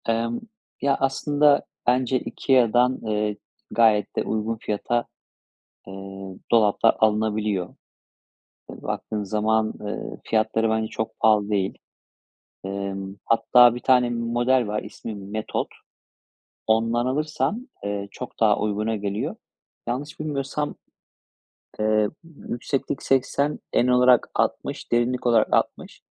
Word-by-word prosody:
Emm, 115 +1 0 0.4
ya 140 0 +3
aslında 145 +2 +3 0.2
bence 125 +1 +2
IKEA'dan, 125 -1 +2
eee, 105 -1 -1 0.3
gayet 110 -3 +3
de - - 0
uygun 110 +1 -2
fiyata, 120 +3 -1 0.8
eee, 95 - -9 0.6
dolaplar 110 -3 +4
alınabiliyor. 105 -3 +1 1.0
Eee, - - -10
baktığın 105 -1 -3
zaman, 110 +2 +1
ııı, 105 0 -5
fiyatları 110 0 +1
bence 110 0 0
çok 110 - -5
pahalı 105 -2 +3
değil. 100 -2 0 0.9
Emm, 95 0 -4
hatta 120 +1 +5
1 120 - -6
tane 125 -2 +4
model 120 +1 +1
var. 105 +1 -2
İsmi 110 - -8
Metod. 105 +2 -3 1.0
Ondan 115 +2 +2
alırsan, 155 - -1 0.2
eee, 100 0 -3
çok - - -9
daha 105 -2 +4
uyguna 105 +1 -1
geliyor. 105 - -3 0.5
Yanlış 140 +6 -4
bilmiyorsam, 145 -1 -2 1.1
eee, 110 0 +3 0.3
yükseklik 130 +3 -3
80, 135 +2 +1
en 120 - +3
olarak 125 -1 +4
60, - - -2
derinlik 120 +1 +1
olarak 115 -2 +3
60. - - -1
115 Hz, 110 wpm, -24 LUFS, 105-125 Hz, 1.1 s, hatta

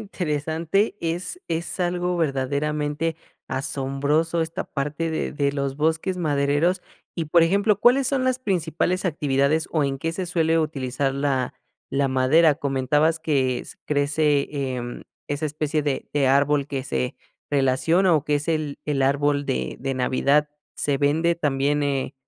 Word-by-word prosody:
interesante. 165 +1 -1
Es 175 - -3
es 165 +2 -3
algo 180 0 0
verdaderamente 150 +1 -1 0.3
asombroso 140 +5 0
esta 160 0 -4
parte 150 +4 -3
de 160 - -2
de 140 -1 +1
los 140 -1 -2
bosques 160 +4 0
madereros. 150 +2 +1 0.3
Y 165 - -1
por 170 +3 +5
ejemplo, 200 +4 +2
¿cuáles 250 +3 +5
son 270 -1 +1
las 255 -1 +1
principales 180 - -1
actividades, 145 -2 +1
o 155 - +2
en 135 -1 -1
qué 165 +4 -2
se 185 +1 -3
suele 165 -2 +2
utilizar 135 -3 -1
la 135 -2 -1 0.4
la 140 0 +1
madera? 135 +5 +4
Comentabas 145 +4 +1
que 130 -6 +1
s - - -10
crece, 145 0 +1 0.3
em, 120 0 -6 0.3
esa 145 +2 -2
especie 150 +1 -1
de 140 -2 -2
de 140 -2 +2
árbol 140 +1 +3
que 135 -1 -3
se 125 -1 -2 0.3
relaciona 145 +7 +3
o 150 -2 +1
que 150 0 +2
es 145 +2 -5
el 155 -3 -1
el 145 -2 0
árbol 145 +1 +1
de 65 0 -2
de 135 +1 -2
Navidad, 140 +3 +2 0.3
¿se 145 -1 0
vende 160 +5 +2
también, 145 -2 0
eh, 140 -1 -1
150 Hz, 150 wpm, -24 LUFS, 140-165 Hz, 0.4 s, por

